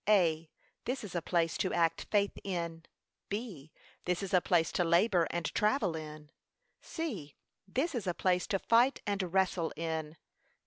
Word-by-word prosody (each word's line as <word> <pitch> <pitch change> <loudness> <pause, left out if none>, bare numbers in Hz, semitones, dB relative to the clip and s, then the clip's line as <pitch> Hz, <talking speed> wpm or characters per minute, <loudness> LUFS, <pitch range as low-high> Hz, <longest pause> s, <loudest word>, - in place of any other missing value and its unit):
(a.) 165 -6 +3 0.4
This 255 0 -2
is 205 - -7
a 175 - -1
place 165 +1 0
to 185 - 0
act 165 -1 +1
faith 205 -1 +3
in. 170 -3 -3 0.4
(b.) 200 - -5 0.3
This 180 +2 0
is 195 0 -5
a 180 - +6
place 170 -3 +2
to 175 - +1
labour 170 +1 +3
and 170 -1 -2
travel 210 -5 +2
in. 155 -1 -8 0.5
(c.) 210 - -5 0.3
This 270 - -1
is 225 -7 -3
a 175 - 0
place 180 -1 +1
to 195 - +1
fight 235 +7 +3
and 195 -4 -1
wrestle 185 -3 +1
in. 160 -1 -3
180 Hz, 165 wpm, -32 LUFS, 165-205 Hz, 0.5 s, a